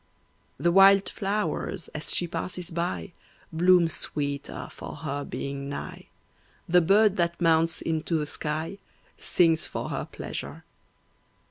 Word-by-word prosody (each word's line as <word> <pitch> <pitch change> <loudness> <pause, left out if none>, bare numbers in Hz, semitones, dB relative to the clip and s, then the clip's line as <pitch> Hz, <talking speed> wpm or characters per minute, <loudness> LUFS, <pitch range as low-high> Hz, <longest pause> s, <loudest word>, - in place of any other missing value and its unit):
The 170 - +2
wild 195 +1 +6
flowers, 200 -2 -2
as 150 - -5
she 175 - +1
passes 180 +1 -4
by, 95 - -3 0.4
Bloom 175 +1 +5
sweeter 145 -3 -3
for - - -8
her 145 +1 -4
being 140 0 -5
nigh; 140 - -7 0.6
The 180 +1 +5
bird 200 +4 +4
that 170 -1 0
mounts 165 -1 +3
into 160 +1 -1
the 150 - -1
sky 155 +6 -3 0.4
Sings 165 -2 +3
for - - -4
her - - -3
pleasure. - - -6
165 Hz, 125 wpm, -27 LUFS, 150-180 Hz, 0.6 s, wild